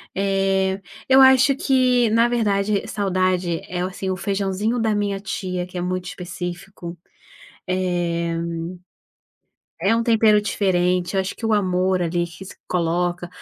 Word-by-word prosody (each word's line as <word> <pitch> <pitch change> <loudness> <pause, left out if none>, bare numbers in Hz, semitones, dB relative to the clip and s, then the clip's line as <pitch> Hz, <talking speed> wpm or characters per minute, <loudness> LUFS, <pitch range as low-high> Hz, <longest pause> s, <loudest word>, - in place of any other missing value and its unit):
Eh, 195 0 +1 0.3
eu 265 0 +7
acho 265 +1 +6
que, 255 -3 +2
na 230 +2 +4
verdade, 210 -4 0
saudade 185 -4 0
é 180 0 -3
o, - - -1
assim, 190 0 -5
o 185 - 0
feijãozinho 200 +4 -1
da 220 -1 +1
minha 200 -1 -1
tia, 185 -2 -4
que 180 - -9
é - - -2
muito 180 0 -2
específico, 175 0 -7 0.7
eh, 175 -2 -1 1.5
é 195 +6 +3
um 230 - +1
tempero 220 -2 +4
diferente, 180 -2 0
acho 190 0 -1
que 225 - -9
o 225 - +1
amor 185 -2 +1
ali 175 0 0
que 175 +3 -11
se - - -11
coloca, 175 0 -1
190 Hz, 145 wpm, -22 LUFS, 180-210 Hz, 1.5 s, eu